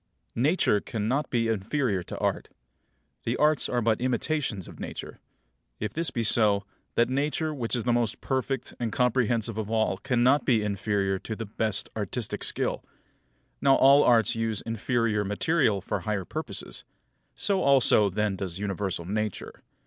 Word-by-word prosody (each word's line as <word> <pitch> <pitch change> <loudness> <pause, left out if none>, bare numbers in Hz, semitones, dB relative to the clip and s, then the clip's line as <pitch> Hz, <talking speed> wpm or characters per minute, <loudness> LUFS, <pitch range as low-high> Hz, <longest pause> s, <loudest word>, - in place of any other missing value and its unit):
10. 115 - -3
Nature 140 - +3
cannot 120 +7 -2
be 115 -2 +1
inferior 110 0 0
to - - -8
Art. - - -1 0.7
The 115 - -1
Arts 150 0 +3
are 120 -2 0
but 110 0 +1
imitations 125 - -1
of - - -12
Nature. - - -7 0.6
If 110 - -3
this 165 -1 0
be 120 -2 -2
so, 105 -2 +4 0.3
that 120 - +3
Nature 150 +4 -1
which 125 -4 -2
is 120 - -1
the 120 - +1
most 120 -3 0
perfect 135 -1 -2
and 115 -2 -2
comprehensive 120 -3 +1
of 105 -1 -4
all 110 -3 +1
cannot 130 +4 +2
be 115 -5 +2
inferior 100 -1 -1
to 110 - -5
the 115 - -5
best 105 0 -1
artistic 110 +2 -3
skill. - - -1 0.8
Now 135 -1 +5
all 140 +2 +6
Arts 115 -4 +4
use 115 -2 -2
inferior 115 -1 0
material 105 - +1
for 100 +2 -3
higher 100 0 -2
purposes; - - -5 0.5
so 195 -2 +1
also 130 -6 +5
then 105 +1 -1
does 95 -2 -4
universal 95 -3 -3
Nature. 105 +1 -4
115 Hz, 155 wpm, -27 LUFS, 105-130 Hz, 0.8 s, all